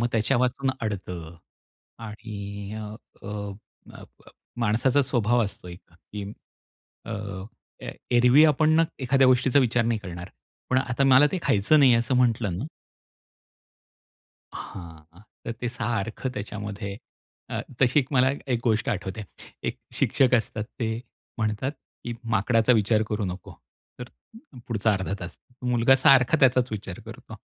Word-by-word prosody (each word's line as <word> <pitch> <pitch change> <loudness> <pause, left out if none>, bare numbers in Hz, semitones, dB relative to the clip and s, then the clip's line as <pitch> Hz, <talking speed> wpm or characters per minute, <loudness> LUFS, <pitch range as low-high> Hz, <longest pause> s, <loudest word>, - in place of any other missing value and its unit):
मग 120 - +2
त्याच्यावाचून 125 +4 +1
आडतं 90 -6 -5 0.7
आणि 100 -2 -7
अ, 110 - -5 0.4
अ, - - -8 0.6
अ, - - -11
ब - - -19 0.3
माणसाचा 120 +6 +2
स्वभाव 120 -1 +1
असतो 100 -2 -7
एक, 85 0 -13
की 100 +4 -9 0.8
अ, 115 - -6 0.7
ए - - -5 0.3
एरवी 125 +6 +6
आपण 155 +1 +4
ना 165 - +5 0.2
एखाद्या 135 +1 +4
गोष्टीचा 130 +1 +4
विचार 120 -3 +2
नाही 115 -1 0
करणार. 90 -2 -8 0.4
पण 130 - +4
आता 130 +1 0
मला 135 +2 +7
ते 190 - 0
खायचं 105 +10 +3
नाही 130 -4 +6
असं 120 +2 +1
म्हंटलं 115 -7 +1
ना 115 - -4 2.0
हां, 85 0 -11 0.2
तर 115 - -3
ते 125 - 0
सारखं 115 0 -3
त्याच्यामध्ये 105 -2 -5 0.5
अ, - - -3 0.2
तशी 130 +2 +4
एक 130 - -5
मला 130 0 +4 0.2
एक 115 - 0
गोष्ट 110 -2 +1
आठवते. 95 +2 -3 0.4
एक - - -2 0.2
शिक्षक 130 -2 +2
असतात, 115 -2 0
ते 115 -2 -2 0.4
म्हणतात, 110 +4 -1 0.3
की 120 - -3 0.2
"माकडाचा 115 +4 +3
विचार 110 -1 +3
करू 105 -1 -2
नको." 90 0 -6 0.5
तर - - -4 0.6
पुढचा 110 -2 +1
अर्धा 95 -1 -2
तास 85 0 -7 0.4
मुलगा 120 +2 +5
सारखा 135 0 +6
त्याचाच 125 -2 +4
विचार 100 -4 -6
करतो. - - -10
115 Hz, 140 wpm, -25 LUFS, 100-125 Hz, 2.0 s, मला